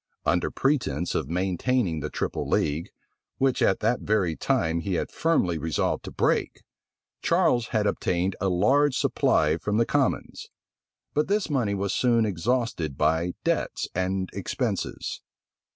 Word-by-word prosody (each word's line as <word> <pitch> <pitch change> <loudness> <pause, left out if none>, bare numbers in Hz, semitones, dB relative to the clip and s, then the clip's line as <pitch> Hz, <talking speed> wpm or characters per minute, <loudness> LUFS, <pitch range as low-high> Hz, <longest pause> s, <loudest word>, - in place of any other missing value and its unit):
Under 85 +4 +2
pretence 115 - 0
of - - -2
maintaining 95 +1 0
the 75 0 -4
triple - - -3
league, 75 +3 0 0.5
which 135 -1 +1
at 95 - +2
that 115 +3 +1
very 100 -6 +1
time 80 +1 0
he 95 +2 -2
had - - -2
firmly 95 - +1
resolved 80 0 -1
to - - -6
break, - - 0 0.6
Charles 120 -2 +2
had 110 -2 0
obtained 95 -1 0
a 100 - +2
large 130 +10 +3
supply 75 +1 +2
from 105 +4 -1
the 115 - +3
commons; - - -1 0.6
but 150 +1 +1
this 205 -4 0
money 115 -8 +1
was 100 0 -1
soon 115 -3 +3
exhausted 105 - -1
by 80 +3 +1
debts - - -1
and 95 +1 -1
expenses. - - -3
95 Hz, 140 wpm, -26 LUFS, 85-120 Hz, 0.6 s, large